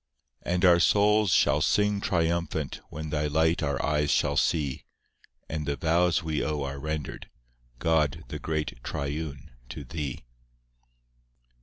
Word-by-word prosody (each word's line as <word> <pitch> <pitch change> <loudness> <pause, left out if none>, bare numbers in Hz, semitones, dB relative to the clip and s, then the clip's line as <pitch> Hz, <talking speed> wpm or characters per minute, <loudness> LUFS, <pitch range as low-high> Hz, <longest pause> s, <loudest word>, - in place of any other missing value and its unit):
IV 85 - -1
And 90 +1 +2
our 85 -1 +6
souls 105 +2 +4
shall 75 -1 +3
sing 105 +5 +2
triumphant 85 -4 -1
When 80 0 -6
Thy 75 0 0
light 80 +3 +2
our 70 -2 -1
eyes 75 -1 +1
shall 70 0 +2
see, 70 -3 0 0.6
And 75 -2 -4
the 70 - 0
vows 85 +2 +2
we 80 -2 -1
owe 75 -1 -2
are 70 0 -5
rendered, 75 0 -5 0.5
God, 75 0 +1
the - - -5
great 75 -6 -3
Triune, 70 0 -4 0.2
to 75 +4 -7
Thee. 70 -2 -5
75 Hz, 140 wpm, -27 LUFS, 70-85 Hz, 0.6 s, our